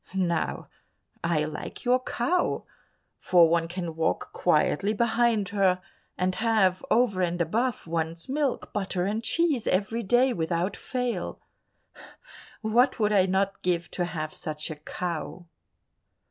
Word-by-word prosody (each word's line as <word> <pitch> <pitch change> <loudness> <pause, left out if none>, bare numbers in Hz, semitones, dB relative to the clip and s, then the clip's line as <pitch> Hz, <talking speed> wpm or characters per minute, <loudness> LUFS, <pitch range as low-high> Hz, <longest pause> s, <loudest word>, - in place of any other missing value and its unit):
Now 170 -4 -1 0.6
I 170 -3 +1
like 155 +8 -6
your 250 +1 +4
cow, 265 +9 0 0.5
for 175 -2 +5
one 165 0 +1
can 175 -2 -5
walk 160 - -1
quietly 200 +7 +2
behind 230 -2 +2
her, 190 -2 +2 0.4
and 185 +1 +1
have, 215 -4 +2
over 220 -5 +3
and 175 0 0
above, 225 +9 0
one's 165 0 -3
milk, 275 -1 -1
butter 190 -3 -1
and 215 +3 -1
cheese 315 -7 +1
every 210 +5 0
day 245 +5 +3
without 170 +2 -1
fail. 250 -2 -3 1.2
What 240 +5 +3
would 210 -1 +2
I 190 -2 +4
not 195 +1 0
give 175 -1 -1
to 175 - -1
have 155 -3 -4
such 155 -2 -4
a - - -5
cow." 170 +2 -5
190 Hz, 130 wpm, -27 LUFS, 170-230 Hz, 1.2 s, for